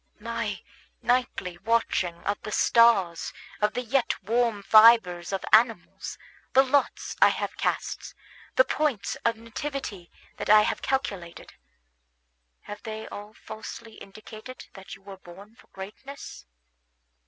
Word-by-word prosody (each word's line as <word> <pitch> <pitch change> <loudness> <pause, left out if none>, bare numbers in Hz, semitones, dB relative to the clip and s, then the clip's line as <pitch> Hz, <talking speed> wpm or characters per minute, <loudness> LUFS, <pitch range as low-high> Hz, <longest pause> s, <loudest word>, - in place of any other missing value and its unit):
My - - -4 0.4
nightly 240 -8 0
watchings 195 -5 0
of 205 0 -1
the 215 - -7
stars, 195 -9 +3 0.3
of 210 +1 +1
the 250 - -2
yet 250 +1 0
warm 225 0 0
fibres 215 -6 +6
of 195 -1 -3
animals, 225 -3 +2 0.4
the 265 - +7
lots 275 +1 0
I - - +8
have - - -3
cast, - - -3 0.4
the 260 - +7
points 260 -11 -1
of 230 0 +2
nativity 230 -5 -6 0.3
that - - -5
I 215 0 +8
have - - -2
calculated, 195 -11 -3 1.1
have 205 - -9
they 220 0 -7
all 210 +1 -9
falsely 220 +1 -10
indicated 215 +5 -11
that 195 -1 -10
you - - -21
were 195 -1 -10
born 190 +4 -14
for - - -21
greatness? 210 - -10
215 Hz, 130 wpm, -26 LUFS, 195-235 Hz, 1.1 s, I